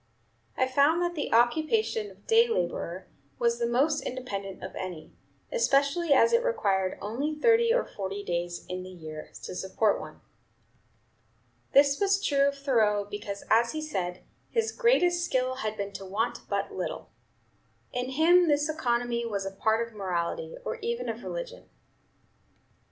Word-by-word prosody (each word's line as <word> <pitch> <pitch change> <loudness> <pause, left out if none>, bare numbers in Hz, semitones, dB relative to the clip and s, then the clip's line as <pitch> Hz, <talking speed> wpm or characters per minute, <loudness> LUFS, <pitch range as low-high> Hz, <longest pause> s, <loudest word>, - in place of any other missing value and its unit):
I 260 - +2
found 280 +5 +3
that 350 0 -1
the 300 -4 -3
occupation 320 - +2
of - - -19
day 460 +1 +5
laborer 175 - -2 0.3
was 235 0 +1
the 235 - +1
most 285 +6 +2
independent 200 -7 -5
of - - -6
any, 180 -4 -7 0.4
especially 310 - +2
as 370 - +5
it 470 +1 +4
required 195 - 0
only 270 +9 -2
thirty 460 +7 +4
or - - +2
forty 200 0 -5
days 175 -1 -3
in 180 0 -4
the 185 - -9
year 155 -4 -9
to - - -6
support 195 +3 +1
one." - - -10 1.5
This 280 0 +5
was 395 -1 +3
true 280 -8 +2
of 280 0 -2
Thoreau, 220 -7 +2
because, 205 -1 -6
as 235 +1 +4
he 310 - -3
said, 180 -12 -3 0.3
his 455 -1 0
"greatest 360 -8 +3
skill 255 -5 0
had 215 -3 -3
been 200 0 -4
to 195 - -7
want 210 +5 -3
but - - -2
little." - - -5 0.8
In 250 +1 -2
him 335 +6 +5
this 295 0 +2
economy 240 -5 0
was 205 -4 -3
a 195 - -3
part 220 +3 +1
of 230 - -17
morality, 190 - -3
or 475 - -3
even 470 +2 -3
of - - -5
religion. - - -6
255 Hz, 155 wpm, -28 LUFS, -, 1.5 s, day